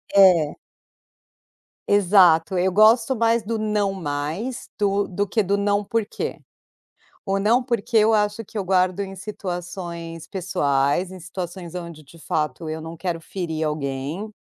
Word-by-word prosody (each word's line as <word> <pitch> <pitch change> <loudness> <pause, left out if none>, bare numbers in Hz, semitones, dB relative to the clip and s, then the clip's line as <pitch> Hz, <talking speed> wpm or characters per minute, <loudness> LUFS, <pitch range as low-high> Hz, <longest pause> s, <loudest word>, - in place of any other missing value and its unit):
É. 180 -6 +6 1.3
Exato, 185 -3 +5
eu 185 +1 +2
gosto 225 +5 +5
mais 230 -1 +2
do 225 +1 -2
"Não 210 -2 0
mais" 165 - -4
do 200 0 +2
do 200 +2 -2
que 220 +1 +1
do 200 +2 +1
"Não 205 0 +1
porquê". 225 0 -3 0.9
O 195 -1 0
não 230 +5 +3
porque 235 -2 -2
eu 220 +1 +5
acho 210 +1 +1
que 215 - -9
eu 200 - -1
guardo 185 0 +2
em 195 -1 -5
situações 175 -4 -6
pessoais, 160 -2 0
em 185 - -9
situações 175 0 -7
onde 170 -3 -7
de 160 +4 -17
fato 150 0 -2
eu 160 0 -4
não 160 +1 -7
quero 175 -1 -3
ferir 160 -3 -4
alguém, 150 +6 -3
190 Hz, 145 wpm, -23 LUFS, 165-205 Hz, 1.3 s, É